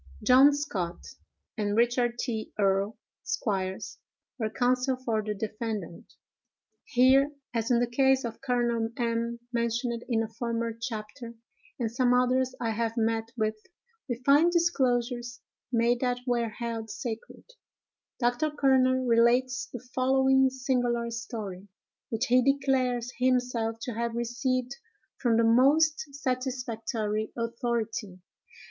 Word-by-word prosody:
"John 265 +3 +7
Scott 190 - -4 0.5
and 205 0 0
Richard 240 0 +2
T. 225 -3 -3
Earl, 195 +1 +1 0.3
Esqs., 190 -2 -3 0.4
were 220 -2 0
counsel 250 +3 +1
for 235 -4 -1
the 210 0 -3
defendant." 215 -4 -5 0.7
Here, 265 +3 +4 0.2
as 230 -1 -1
in 240 -2 +4
the 245 - +3
case 265 +2 +2
of 230 -1 -6
Col. 245 -2 +1 0.3
M——, 235 0 -1
mentioned 235 0 -1
in 225 -2 +2
a - - -4
former 230 0 -3
chapter, 230 0 -7 0.4
and 230 -3 -2
some 245 +1 +2
others 255 +1 +2
I 230 -2 -1
have 225 +1 -2
met 225 0 0
with, 215 -1 +1 0.6
we 240 - 0
find 295 +5 +5
disclosures 245 -7 0 0.3
made 235 0 +2
that 245 -1 -1
were 240 -2 0
held 225 0 -5
sacred. 225 +1 -6 0.8
Dr. 245 +5 +1
Kerner 260 -3 +3
relates 245 +2 +3
the 245 0 -9
following 265 +1 +3
singular 245 -3 -1
story, 215 -5 -6 0.4
which 225 +2 -1
he 250 +1 +4
declares 255 -3 +1
himself 250 -3 +1
to 245 - -4
have 235 +1 -2
received 245 +2 -1 0.4
from 235 -3 +2
the 230 - +4
most 290 +5 +3
satisfactory 245 -5 -2
authority. 230 -4 -3
240 Hz, 125 wpm, -28 LUFS, 225-255 Hz, 0.8 s, John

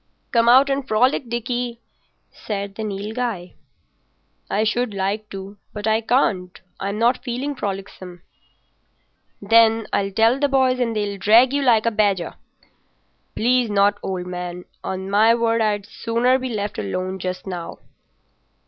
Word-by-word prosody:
"Come 235 -1 +3
out 260 +3 +7
and 275 0 -2
frolic, 245 +2 +2
Dickie," 240 0 -3 0.5
said 200 -2 -5
the 220 - -7
Nilghai. 210 -1 -4 1.0
"I 210 - +1
should 220 0 -1
like 200 +2 -2
to, 195 +1 -8 0.2
but 210 -1 -5
I 220 0 +2
can't. 205 -7 0 0.2
I'm 200 +1 -3
not 235 +3 +2
feeling 260 +3 -3
frolicsome." 190 -6 -6 1.2
"Then, 225 +1 +4
I'll 195 0 +1
tell 225 +6 +3
the 285 0 +2
boys 260 -2 +2
and 230 -2 0
they'll 205 -2 -2
drag 230 +7 +5
you 285 - +1
like 235 -5 +3
a 230 - +2
badger." 200 -5 0 1.0
"Please 245 0 +2
not, 205 0 +2
old 185 -2 -4
man. 180 0 -6 0.2
On 190 0 -4
my 215 +4 +4
word, 230 -1 +1
I'd 205 -2 0
sooner 235 +4 0
be 260 0 -4
left 210 -3 -3
alone 185 - -3
just 185 0 -4
now." 180 -3 -6
215 Hz, 145 wpm, -21 LUFS, 195-240 Hz, 1.2 s, out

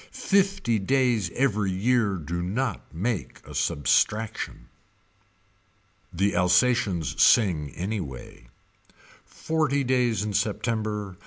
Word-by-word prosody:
Fifty 195 - +1
days 120 -3 +1
every 105 -7 +1
year 105 +2 +1
do 85 +1 -4
not 105 +4 -3
make 100 +3 -3
substraction. 105 - 0 1.4
The 95 +2 0
Alsations 90 - +2
sing 85 -10 +4
anyway. 85 - -6 0.8
Forty 155 -3 -1
days 125 -5 +1
in 105 -1 -3
September. 105 -2 -2
105 Hz, 85 wpm, -25 LUFS, 90-125 Hz, 1.4 s, sing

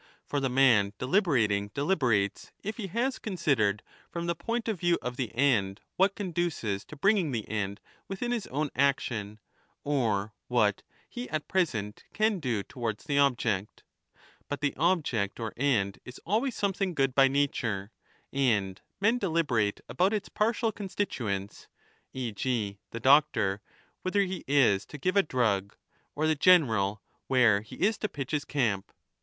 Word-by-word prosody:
For 145 - -1
the 135 -1 0
man 120 -6 +4
deliberat 130 - +2
ing 100 0 0
deliberates 130 - +1
if 215 +2 -4
he 210 -4 -4
has 240 +8 -1
considered, 125 - 0 0.3
from 170 0 -4
the 170 - +1
point 230 +7 -3
of 215 -6 -1
view 175 0 +2
of 125 0 -5
the 125 -4 -3
end, 110 -7 +2 0.2
v/hat 195 +1 +3
^ - - -48
conduces 170 - -2
to - - -11
bringing 195 +1 +2
the 115 -4 -3
end 100 -2 -3 0.3
within 220 +6 -3
his 235 -4 -2
own 145 +2 -2
action, 120 -6 0 0.5
or 110 -8 0
what 110 -5 +2 0.3
he 245 +1 -7
at 155 -2 -3
present 110 - -1
can 215 -2 +1
do 120 -9 -1
towards 115 -3 -4
the 145 -2 +1
object. 115 -7 0 0.7
But 145 - -3
the 145 -1 0
object 145 - 0
or 110 -2 -4
end 115 -8 +1
is 125 - -10
always 225 +7 0
something 195 -2 -1
good 135 -2 +1
by 135 0 +6
nature, 120 -7 -1 0.4
and 105 -8 +1 0.2
men 225 +5 +3
deliberate 150 - 0
about 190 +4 +1
its 210 -2 -2
partial 225 +1 +1
constituents, 125 - -4 0.4
e. 125 -3 -3
g. 105 -3 -2
the 115 - -6
doctor 115 -7 +3 0.4
whether 195 +2 +1
he 190 -2 -2
is 125 -8 +4
to - - -9
give 185 +6 -1
a 200 - +7
drug, 110 - 0 0.4
or 155 - 0
the 155 - +3
general 115 - +3 0.2
where 115 -6 +4
he 110 - -11
20 195 - +2
is 220 - -1
to 210 - -2
pitch 135 -3 -6
his 150 -1 -1
camp. 110 -9 -1
135 Hz, 160 wpm, -29 LUFS, -, 0.7 s, a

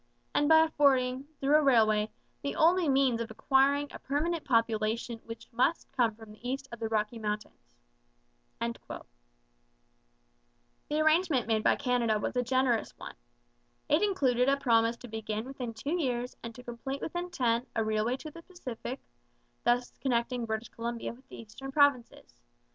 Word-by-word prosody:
and 290 +1 +2
by 320 0 +8
affording, 265 -4 +2 0.2
through 275 +2 +1
a 305 - +6
railway, 220 -6 +4 0.3
the 280 - -3
only 340 0 +4
means 265 -4 +3
of 230 - -4
acquiring 275 +5 +2
a - - -9
permanent 310 +4 -1
population 230 -1 0
which 230 0 -9
must 250 +8 +1
come 240 -5 +1
from 220 -1 -13
the 230 +3 -7
east 270 +1 -3
of 235 - -8
the 225 - -2
Rocky 220 +1 -1
Mountains. 210 - -5 0.8
The - - -5 2.0
arrangement 310 -4 +3
made 220 -1 +1
by - - +4
Canada 240 -4 +1
was 210 - -3
a 250 - +2
generous 250 -2 0
one. - - -8 0.8
It 300 +3 +4
included 270 -11 +2
a 275 - +3
promise 230 -3 +2
to 245 - -10
begin 220 0 -4
within 255 -3 -5
two 285 +10 -2
years 250 -3 -2
and 230 -1 -8
to 250 - -11
complete 250 +3 -5
within 350 +2 -3
ten 245 -6 0
a 225 - +2
railway 220 +3 0
to 310 +2 -9
the 335 - -11
Pacific, 260 -8 -7 0.7
thus 245 +1 +2
connecting 240 -1 0
British 220 +1 -3
Columbia 235 0 -4
with 255 +3 -20
the - - -10
eastern 250 +5 -9
provinces. 280 -4 +1
245 Hz, 160 wpm, -30 LUFS, 230-275 Hz, 2.0 s, by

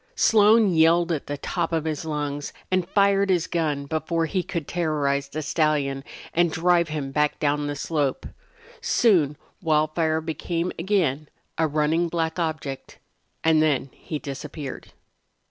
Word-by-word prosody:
Slone 215 -2 +5
yelled 165 +1 +4
at 155 -4 -2
the 145 - -3
top 170 +4 -2
of 160 -1 -1
his 155 0 -3
lungs 145 -2 -3 0.2
and 185 -2 +1
fired 200 -1 +3
his 180 -3 +2
gun 150 -4 -1
before 160 +2 -1
he 185 +3 -1
could 170 -4 -5
terrorize 145 -5 0
the 155 +2 -4
stallion 145 -3 0 0.3
and 170 0 +3
drive 170 +1 +2
him 145 -3 -4
back 150 +1 +1
down 145 0 0
the 145 - -3
slope. 145 -3 -1 0.6
Soon 190 - +3 0.2
Wildfire 155 0 +1
became 165 +2 -3
again 165 -6 0 0.3
a 160 - +1
running 155 +3 +1
black 165 0 -2
object, 155 -5 -4 0.5
and 160 -1 +4
then 140 -4 +1
he 155 - -6
disappeared. 145 0 -7
160 Hz, 145 wpm, -24 LUFS, 145-170 Hz, 0.6 s, Slone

